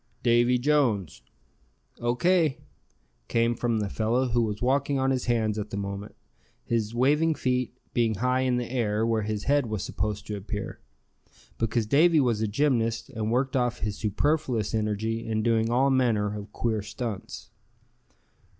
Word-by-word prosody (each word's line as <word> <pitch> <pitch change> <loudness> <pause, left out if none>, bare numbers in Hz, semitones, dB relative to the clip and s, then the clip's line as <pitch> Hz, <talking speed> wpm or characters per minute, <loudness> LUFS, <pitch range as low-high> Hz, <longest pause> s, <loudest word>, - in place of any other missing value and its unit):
"Davy 120 +1 +4
Jones." 125 - +1 0.8
"O. 120 +1 0
K." 170 -1 +2 0.7
came 115 0 +2
from 120 -1 -1
the 105 -1 -1
fellow 120 +5 0
who 120 0 +2
was 105 -2 -2
walking 140 +2 +1
on 135 0 +1
his 130 -1 -1
hands 110 -3 +1
at 105 0 -4
the 100 - -5
moment, 100 +1 -5 0.5
his 115 -1 -1
waving 150 +6 +3
feet 125 -2 -1 0.2
being 115 -2 +1
high 125 +5 +1
in 130 -1 +1
the 120 -1 -2
air, 110 -3 0
where 115 -1 +1
his 105 0 -3
head 140 -2 +2
was 110 -3 -3
supposed 105 +1 -3
to 105 - -4
appear; 100 +1 -5 0.8
because 115 0 0
Davy 155 +7 +4
was 120 -6 +1
a 110 - +1
gymnast, 115 0 0
and 110 -3 -2
worked 130 +2 0
off 125 -2 0
his 105 -2 -2
superfluous 120 0 0
energy 110 +1 -1
in 110 -1 -1
doing 115 -1 +2
all 130 +3 +3
manner 110 -6 +1
of 105 0 -8
queer 110 -2 -1
stunts. 110 0 -6
115 Hz, 160 wpm, -27 LUFS, 110-130 Hz, 0.8 s, Davy